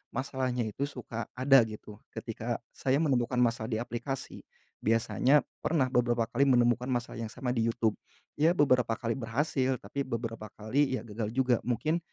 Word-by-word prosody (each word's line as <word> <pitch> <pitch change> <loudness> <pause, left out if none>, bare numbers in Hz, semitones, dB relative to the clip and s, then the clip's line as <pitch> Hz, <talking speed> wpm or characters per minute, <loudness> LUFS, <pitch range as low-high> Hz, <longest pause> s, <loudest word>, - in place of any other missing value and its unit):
masalahnya 130 -2 -1
itu 110 +6 -2
suka 115 -4 -6
ada 135 +1 +6
gitu 105 -1 -10 0.2
ketika - - -3 0.2
saya 130 0 0
menemukan 125 -5 +1
masalah 115 -2 +1
di - - +1
aplikasi, 120 +3 -5 0.4
biasanya 120 +5 +3 0.2
pernah 140 -6 +1
beberapa 120 -2 +2
kali 140 0 +3
menemukan 120 -1 +3
masalah 120 -2 -2
yang 115 - -3
sama 125 -2 -3
di 115 -2 +1
YouTube, 115 -2 0 0.4
ya 165 +4 +4
beberapa 125 -6 +3
kali 115 0 -2
berhasil 130 +2 0
tapi 135 +7 -4
beberapa 115 -3 -4
kali 130 +5 +1
ya - - -8
gagal 105 0 -4
juga 125 -3 +3
mungkin 155 +8 +1
125 Hz, 160 wpm, -30 LUFS, 115-135 Hz, 0.4 s, ada